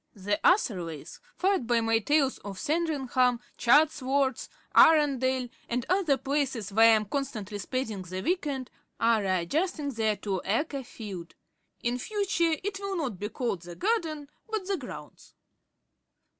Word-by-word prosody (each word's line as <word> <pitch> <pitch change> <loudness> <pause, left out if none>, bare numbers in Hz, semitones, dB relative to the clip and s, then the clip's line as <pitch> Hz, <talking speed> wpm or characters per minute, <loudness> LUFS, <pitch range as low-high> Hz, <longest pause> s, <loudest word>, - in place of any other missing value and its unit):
The 205 +1 -1
Atherleys, 180 - +1 0.2
fired 375 - +1
by 240 -1 +3
my 225 0 +2
tales 275 +3 +1
of 200 -2 -8
Sandringham, 265 - +1 0.2
Chatsworth, 275 -1 +2 0.3
Arundel, 260 -5 +5 0.2
and 240 0 -1
other 355 -7 +3
places 265 -6 -2
where 225 +2 +7
I 225 - +7
am 215 -1 0
constantly 210 -5 -4
spending 225 -2 -3
the 185 +1 -5
week 355 -1 0
end, 265 -3 -4 0.3
are 230 -1 +3
re 195 - -2 0.2
adjusting 305 - -1
their 220 -3 0
two 195 -3 -3
acre 275 +5 -1
field. 195 -8 -8 0.5
In 240 +1 0
future 360 - 0
it 390 0 -3
will 395 -1 -3
not 250 - -3
be 210 - -3
called 225 -5 -2
"the 175 0 -9
garden," 330 -9 -1 0.2
but 435 -3 -2
"the 395 0 -1
grounds." 260 -6 -10
260 Hz, 145 wpm, -28 LUFS, 215-310 Hz, 0.5 s, where